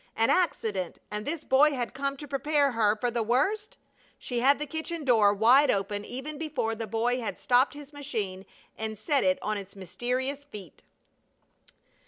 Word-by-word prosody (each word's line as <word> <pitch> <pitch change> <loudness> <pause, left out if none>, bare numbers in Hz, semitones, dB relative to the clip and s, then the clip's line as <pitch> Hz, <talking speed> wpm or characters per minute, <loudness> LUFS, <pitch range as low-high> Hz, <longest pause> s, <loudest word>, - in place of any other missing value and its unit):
An 225 0 +3
accident! 220 - 0
And 210 +1 -5
this 310 +1 -3
boy 285 +3 +4
had 245 -3 -3
come 275 +1 -2
to 295 - -8
prepare 285 0 +1
her 220 -3 +2
for 240 +3 -1
the 235 0 -1
worst? 295 - 0 0.4
She 245 -2 -3
had 275 +4 +4
the 300 - -3
kitchen 320 +2 -5
door 220 -6 +5
wide 240 +8 +5
open 205 +1 -1
even 290 +4 -6
before 265 -8 -2
the 225 0 -5
boy 235 +4 0
had 225 - -4
stopped 255 +4 +2
his 290 0 -11
machine 215 -10 -4 0.3
and 220 -1 -5
set 280 +6 +1
it 280 0 +3
on 215 -1 -1
its 200 0 -11
mysterious 255 - -3
feet. 210 - -11
250 Hz, 175 wpm, -28 LUFS, 215-285 Hz, 0.4 s, door